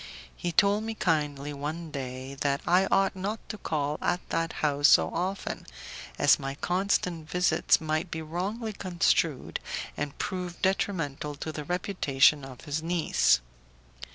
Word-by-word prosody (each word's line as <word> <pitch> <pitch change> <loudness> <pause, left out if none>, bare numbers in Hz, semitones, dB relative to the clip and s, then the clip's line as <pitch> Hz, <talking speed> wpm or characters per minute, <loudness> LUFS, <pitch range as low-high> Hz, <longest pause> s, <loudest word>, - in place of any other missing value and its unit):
He 175 - -3
told 200 +4 +3
me 225 0 -4
kindly 150 -5 0
one 155 +3 -5
day 130 -1 -5
that 140 +1 +1
I 185 +2 +4
ought 195 0 +2
not 205 +4 -3
to 215 - -5
call 150 -3 -1
at 180 - -1
that 165 0 -1
house 145 0 +4
so - - +5
often, 185 +4 -3 0.5
as - - +5
my 135 -1 -4
constant 180 -2 0
visits 180 -2 +3
might 155 +2 -1
be 160 -1 -4
wrongly 200 +8 -3
construed, 170 -6 0 0.4
and 145 -1 -4
prove 180 -2 -4
detrimental 160 -7 -1
to 155 - -5
the 150 -1 -6
reputation 150 -5 +2
of 130 -2 -10
his 150 +2 -3
niece. 160 - +3
160 Hz, 145 wpm, -28 LUFS, 145-185 Hz, 0.5 s, so